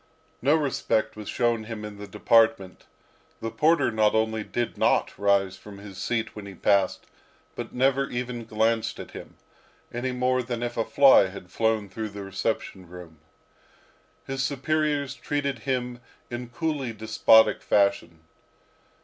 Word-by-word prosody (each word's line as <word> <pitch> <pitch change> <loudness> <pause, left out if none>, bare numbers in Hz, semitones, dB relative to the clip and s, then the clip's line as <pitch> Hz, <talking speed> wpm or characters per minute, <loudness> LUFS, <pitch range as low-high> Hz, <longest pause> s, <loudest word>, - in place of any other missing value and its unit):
No 145 +5 +4
respect 130 -7 0
was 105 -1 -8
shown 120 -2 0
him 110 -1 -6
in 105 -1 -9
the 105 - -8
department. 110 -2 +2 0.5
The 115 - -4
porter 160 -4 +3
not 110 -1 +2
only 110 0 0
did 120 +2 -3
not - - +1
rise 100 -2 +1
from 105 -1 -12
his 100 -1 -10
seat 115 +2 -2
when 105 -2 -8
he 95 - -10
passed, 100 -2 +1 0.5
but - - -6
never 135 +2 +1
even 120 -1 -4
glanced 110 +1 0
at - - -8
him, - - -10 0.6
any 125 +2 -2
more 125 0 +1
than 120 -1 -4
if 120 - -3
a 115 - +1
fly 135 -6 +6
had 95 -1 -11
flown 110 -1 0
through 110 +3 -5
the 100 0 -8
reception 95 -1 -3
room. 85 -3 -12 1.1
His 135 0 -3
superiors 145 0 0
treated 140 -3 -3
him 125 -2 -2 0.3
in 120 0 -5
coolly 135 -1 -2
despotic 110 +1 +4
fashion. 100 -5 +1
115 Hz, 150 wpm, -26 LUFS, 100-125 Hz, 1.1 s, fly